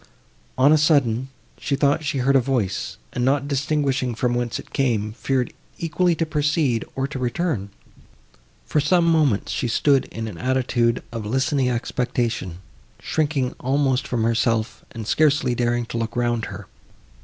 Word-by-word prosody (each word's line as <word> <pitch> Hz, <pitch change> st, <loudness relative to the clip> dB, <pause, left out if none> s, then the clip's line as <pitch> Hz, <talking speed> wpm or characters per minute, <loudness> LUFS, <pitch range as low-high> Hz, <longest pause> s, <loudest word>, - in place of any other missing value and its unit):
On 135 Hz, +3 st, +5 dB
a 155 Hz, -, +4 dB
sudden, 135 Hz, -5 st, +2 dB, 0.3 s
she 140 Hz, -, -1 dB
thought 145 Hz, +2 st, +2 dB
she 145 Hz, -2 st, -1 dB
heard 135 Hz, +2 st, +2 dB
a -, -, +7 dB
voice, 120 Hz, -7 st, -2 dB, 0.2 s
and, 125 Hz, -, -1 dB
not 140 Hz, +2 st, +2 dB
distinguishing 140 Hz, -3 st, 0 dB
from 120 Hz, +1 st, 0 dB
whence 120 Hz, -1 st, -1 dB
it -, -, -11 dB
came, 115 Hz, -6 st, 0 dB
feared 130 Hz, +1 st, -1 dB, 0.2 s
equally 170 Hz, +1 st, +1 dB
to 165 Hz, -, 0 dB
proceed, 150 Hz, -5 st, +1 dB
or 135 Hz, 0 st, -1 dB
to 140 Hz, -2 st, -6 dB
return. 125 Hz, -, -1 dB, 1.0 s
For 150 Hz, -, +1 dB
some 170 Hz, +4 st, +3 dB
moments, 155 Hz, -10 st, +2 dB
she 125 Hz, -, -1 dB
stood 135 Hz, +3 st, +3 dB
in 115 Hz, 0 st, -6 dB
an 100 Hz, -6 st, -8 dB
attitude 125 Hz, -2 st, +1 dB
of 115 Hz, -3 st, -5 dB
listening 130 Hz, +2 st, +1 dB
expectation, 120 Hz, -6 st, -2 dB, 0.4 s
shrinking 145 Hz, -5 st, -1 dB
almost 135 Hz, 0 st, +1 dB
from 120 Hz, -3 st, -1 dB
herself 115 Hz, -1 st, 0 dB
and 115 Hz, -2 st, -7 dB
scarcely 145 Hz, -1 st, +2 dB
daring 120 Hz, 0 st, 0 dB
to 115 Hz, -, -5 dB
look 115 Hz, 0 st, -3 dB
round 120 Hz, -2 st, 0 dB
her. 100 Hz, 0 st, -8 dB
130 Hz, 155 wpm, -23 LUFS, 115-145 Hz, 1.0 s, a